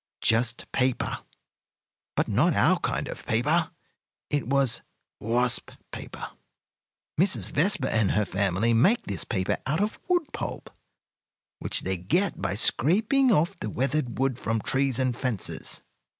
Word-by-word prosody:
Just 115 +2 +2
paper. 130 -1 0 1.0
But - - +1
not - - +2
our - - +4
kind - - -2
of - - -7
paper; 150 +9 +1 0.6
it 145 -5 0
was 135 -2 +2 0.4
wasp 120 +3 0 0.2
paper. - - -7 0.9
Mrs. 120 - +2
Vespa 155 -3 +1
and 110 -3 +2
her 105 0 +2
family 100 +4 +1
make 185 - +4
this 100 - -4
paper 95 -6 -1
out 150 +4 0
of 210 +2 -1
wood 350 -5 0
pulp, - - -5 0.9
which - - 0
they 95 0 -2
get 170 - 0
by - - -1
scraping 220 - +3
off 170 -4 +2
the 110 - -4
weathered 130 +2 -1
wood 130 -2 0
from 115 0 -1
trees 135 +2 +1
and 130 -2 0
fences. 125 -6 -4
130 Hz, 135 wpm, -26 LUFS, 110-155 Hz, 1.0 s, our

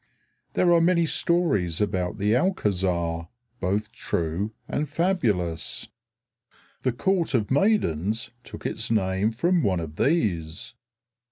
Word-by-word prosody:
There 175 -1 +4
are 170 - +5
many 170 0 +3
stories 150 - +1
about 95 -3 -1
the 105 +1 +1
Alcázar, 90 - 0 0.3
both 100 +3 -1
true 85 +6 -2 0.2
and 150 0 -2
fabulous. 120 - 0 0.9
The 130 - +1
Court 170 +4 0
of 110 -2 0
Maidens 115 - +1
took - - -10
its 110 - -2
name 95 -1 +1
from 170 +10 +2
one 95 - +1
of 80 -2 -7
these. 105 - 0
105 Hz, 115 wpm, -25 LUFS, -, 0.9 s, are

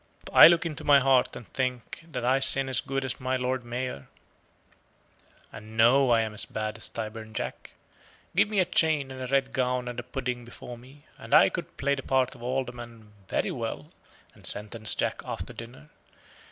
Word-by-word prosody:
I - - +11
look 170 0 +3
into 155 -3 -4
my 145 -1 +6
heart 135 -2 +2
and 120 - -10
think 125 +3 -3
that 125 -7 -5
I 130 +2 +3
sin 135 0 +6
as 125 -5 0
good 135 0 -3
as 130 - -3
my 130 0 -1
Lord 125 0 -2
Mayor, 120 - -5 1.4
and 110 +1 -11
know 125 +4 +5
I 115 -1 +4
am 110 -1 -3
as 105 - -2
bad 110 0 -4
as 115 - -1
Tyburn 110 0 -7
Jack. - - -6 0.6
Give - - +3
me 210 -2 0
a 185 - +4
chain 155 -6 +2
and 130 -1 -6
red 135 0 +1
gown 125 -1 -1
and 120 0 -5
a - - -5
pudding 125 -1 -4
before 120 0 -10
me, 130 +5 -17
and - - 0
I - - +7
could - - -7
play 140 +1 0
the 135 - -3
part 130 -1 0
of 125 - -15
Alderman 120 -3 -5
very - - -1
well, - - -5 0.4
and - - -7
sentence 105 +1 0
Jack - - -2
after - - -6
dinner. 115 - -11
125 Hz, 190 wpm, -27 LUFS, 115-135 Hz, 1.4 s, I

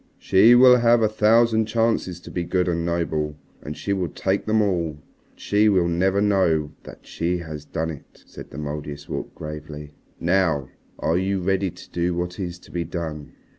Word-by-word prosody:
"She 110 +6 +5
will 125 0 +8
have 120 -1 +4
a - - +5
thousand 110 +1 +3
chances 110 -6 0
to - - -11
be 90 - -2
good 90 +1 0
and 85 -1 0
noble. 80 -3 -1 0.3
And 75 +1 -7
she 100 - -2
will 95 -3 -1
take 95 +2 -2
them 110 0 +3
all. 90 -6 0 0.4
But - - -31
she 105 +1 +2
will 90 -4 +3
never 95 +4 +1
know 90 -7 +2
that - - -12
she 85 +2 -2
has 80 -3 -8
done 80 +1 -3
it," 75 - -13
said - - -11
the - - -10
Mouldiestwarp 75 -1 -6
gravely. 75 -1 -8 0.3
"Now 85 -6 +1 0.3
are 80 +3 0
you 95 +1 -1
ready 95 +1 0
to - - -14
do 85 0 -1
what 90 +1 -4
is 90 -2 -4
to - - -17
be 85 -1 -2
done?" 80 -3 -6
90 Hz, 185 wpm, -23 LUFS, 80-100 Hz, 0.4 s, will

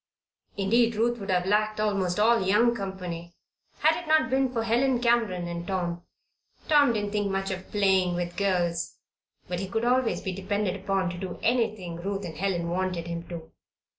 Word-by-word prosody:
Indeed, 230 +4 +3
Ruth 235 +2 +1
would 200 -1 -7
have 180 -1 +2
lacked 215 +2 +1
almost 200 -3 0
all 230 +2 +4
young 210 +5 +3
company 180 -5 -6 0.5
had 320 +2 +3
it - - -13
not 310 -2 +3
been 265 -1 +2
for 230 -3 -1
Helen 245 +3 +2
Cameron 230 -7 +1
and 170 0 -5
Tom. 175 -3 -2 0.7
Tom 295 -5 +5
didn't 205 -2 -2
think 205 -1 0
much 195 0 -1
of 185 0 -6
"playing 190 -3 +2
with 175 0 -3
girls;" 175 -4 0 0.5
but 180 -1 -3
he 195 - -3
could 225 +3 -1
always 250 -1 +2
be 190 - -2
depended 195 +1 -1
upon 195 -2 -1
to 175 - -7
do 185 -1 -5
anything 215 -8 0
Ruth 195 +2 -3
and 165 - -7
Helen 175 0 -1
wanted 180 -2 -1
him 170 0 -5
to. 165 -2 -8
195 Hz, 180 wpm, -27 LUFS, 180-225 Hz, 0.7 s, Tom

